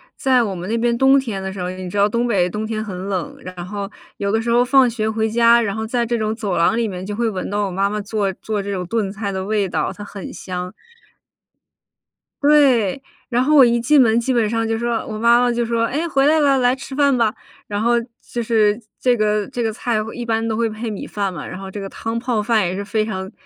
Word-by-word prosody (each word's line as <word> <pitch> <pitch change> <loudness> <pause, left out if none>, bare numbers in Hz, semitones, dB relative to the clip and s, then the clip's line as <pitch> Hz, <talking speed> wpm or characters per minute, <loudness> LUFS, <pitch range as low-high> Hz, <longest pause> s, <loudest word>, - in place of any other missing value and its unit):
在 260 -3 +3
我 205 -5 -2
们 180 +1 -6
那 225 - -1
边 235 0 +1
冬 270 +2 +5
天 225 -7 -4
的 190 0 -5
时 190 - -6
候， 180 - -2
你 185 0 -6
知 175 - -9
道 200 +1 +4
东 235 +3 0
北 185 -6 +2
冬 210 +4 -4
天 215 0 -3
很 190 -2 -6
冷， 185 -5 -3
然 180 -1 -8
后 200 0 -5 0.3
有 200 -1 -1
的 220 +1 +1
时 235 - -3
候 240 +1 +4
放 265 -1 +5
学 220 -2 -2
回 220 0 0
家， 235 +1 +5
然 200 -4 -2
后 220 0 -3
在 240 +1 0
这 235 +1 -1
种 215 0 -1
走 210 -5 -2
廊 170 +6 +3
里 230 -1 0
面 185 -2 -6
就 205 +1 -4
会 230 +1 0
闻 190 -4 -4
到 205 +1 0
我 - - -5
妈 195 +2 +1
妈 210 +1 -3
做 205 -1 -1
做 210 +2 -3
这 200 - -4
种 185 -2 -3
炖 215 -1 -1
菜 200 0 -4
的 190 -1 -3
味 205 -2 0
道， - - -1
它 205 - -9
很 200 -2 -8
香。 180 0 -6 1.7
对， 275 -7 +4 0.3
然 245 0 +2
后 305 +3 +3
我 275 -3 +9
一 235 0 +2
进 285 +5 +4
门 230 -1 +4
基 235 +3 -1
本 230 -3 +2
上 225 0 0
就 225 0 0
说 235 0 -1
我 215 - -5
妈 235 +2 +5
妈 245 0 +2
就 240 0 0
说： 230 0 0
“诶 305 +7 -2
回 275 -3 +2
来 315 +1 +4
了， 280 -2 +3
来 250 0 +3
吃 270 +1 -9
饭 280 -1 +3
吧”。 225 -3 +2 0.3
然 205 0 -2
后 235 +2 +2 0.3
就 240 - -4
是 215 -1 +2 0.2
这 250 -1 +3
个 210 -1 +1
这 240 - -3
个 225 - 0
菜 235 0 -1 0.2
一 240 - -5
般 225 -1 0
都 220 - -1
会 230 0 0
配 220 +2 -5
米 205 - -6
饭 200 -2 -2
嘛， 150 - -6
然 185 - -7
后 195 0 -8
这 205 - -6
个 195 -1 -6
汤 225 +3 -4
泡 240 -3 -1
饭 220 -2 +2
也 180 - -3
是 200 +1 -4
非 215 +1 0
常 190 -3 -5
220 Hz, 280 characters per minute, -20 LUFS, 200-235 Hz, 1.7 s, 我